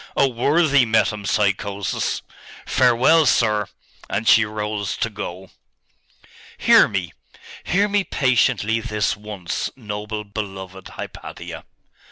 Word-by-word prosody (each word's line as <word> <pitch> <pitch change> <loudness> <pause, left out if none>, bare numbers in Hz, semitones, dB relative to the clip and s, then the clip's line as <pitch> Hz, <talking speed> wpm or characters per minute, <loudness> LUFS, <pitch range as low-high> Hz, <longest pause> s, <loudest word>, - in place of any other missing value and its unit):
Oh 135 - +4
worthy 140 +3 +3
metempsychosis! 100 -2 0 0.4
Farewell, 130 +5 +4
sir!' 105 -4 +2 0.4
And 105 +3 -2
she 115 - +6
rose 105 -3 -3
to 115 - -1
go. 95 -2 -7 1.1
'Hear - - +6
me! 95 -4 -3 0.5
hear 200 +4 +2
me 205 -1 +1
patiently 125 - +1
this 105 -3 -1
once, 105 -4 -4
noble, 105 -2 -5
beloved 95 -3 -7
Hypatia! - - -9
105 Hz, 100 wpm, -21 LUFS, 100-120 Hz, 1.1 s, she